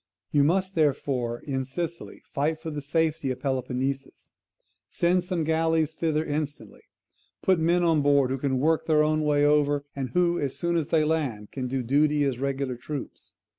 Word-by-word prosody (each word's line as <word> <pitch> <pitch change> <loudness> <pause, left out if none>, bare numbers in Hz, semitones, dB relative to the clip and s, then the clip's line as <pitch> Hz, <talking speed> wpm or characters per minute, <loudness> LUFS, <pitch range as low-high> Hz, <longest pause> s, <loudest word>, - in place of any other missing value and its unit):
You 145 -1 +4
must, 185 +5 +1
therefore, 135 -6 0
in 135 -3 -2
Sicily 170 +6 -6
fight 155 +3 0
for 160 0 -6
the 150 -1 -4
safety 155 0 0
of 130 -1 -3
Peloponnesus. 130 0 -3 0.6
Send 175 +1 +1
some 180 -2 -2
galleys 160 0 +1
thither 160 -1 -1
instantly. 150 0 -4 0.6
Put 185 -3 +3
men 170 +2 +2
on 165 -3 +3
board 140 -2 +3
who 135 - -2
can 130 -1 0
work 155 +4 +1
their 155 -1 +4
own 155 0 +1
way 145 -1 +2
over, 145 -1 +2
and 135 -2 -3
who, 175 -1 +2
as 140 -2 -3
soon 170 0 -1
as 160 -4 0
they 160 -2 +3
land, 140 -10 -1
can 130 -2 -4
do 130 0 -2
duty 145 +4 +2
as 135 -4 -1
regular 135 -2 -2
troops. 120 -7 -8
150 Hz, 175 wpm, -26 LUFS, 135-160 Hz, 0.6 s, You